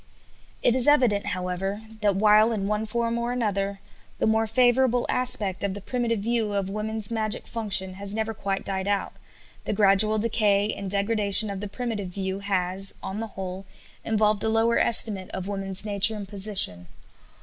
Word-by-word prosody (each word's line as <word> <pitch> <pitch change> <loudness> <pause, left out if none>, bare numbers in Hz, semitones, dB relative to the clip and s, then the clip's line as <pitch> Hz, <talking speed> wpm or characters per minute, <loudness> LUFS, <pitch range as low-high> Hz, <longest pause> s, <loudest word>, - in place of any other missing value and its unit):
It 240 - +3
is 255 0 +5
evident, 250 -9 +3
however, 185 +3 -3 0.2
that, 205 -2 +1
while, 215 +2 +4
in 205 -4 -2
one 210 +2 -2
form 235 +1 -2
or 235 +1 -2
another, 200 -5 -2 0.4
the - - -1
more 220 0 +1
favorable 245 +1 +2
aspect 215 -7 0
of 200 -1 -2
the - - -6
primitive 230 0 -2
view 225 -1 -1
of 195 -1 -2
women's 215 +1 -2
magic 215 -2 -3
function 195 -5 0
has 200 +2 -3
never 220 0 -2
quite 195 -2 -4
died 190 0 -3
out, 205 -1 -1 0.5
the - - -2
gradual 205 +1 +3
decay 210 -2 +1
and 200 -1 -6
degradation 205 +1 +4
of 195 - -6
the 205 - -5
primitive 220 -3 -4
view 190 +1 -5
has, 195 -1 -1
on 195 +2 -5
the 225 - -4
whole, 190 0 -6 0.4
involved 215 -1 0
a 220 - 0
lower 225 +1 +2
estimate 205 -5 +5
of 190 0 -5
women's 195 0 -3
nature 205 +1 +3
and 205 -2 -7
position. 190 - 0
205 Hz, 170 wpm, -25 LUFS, 195-225 Hz, 0.5 s, is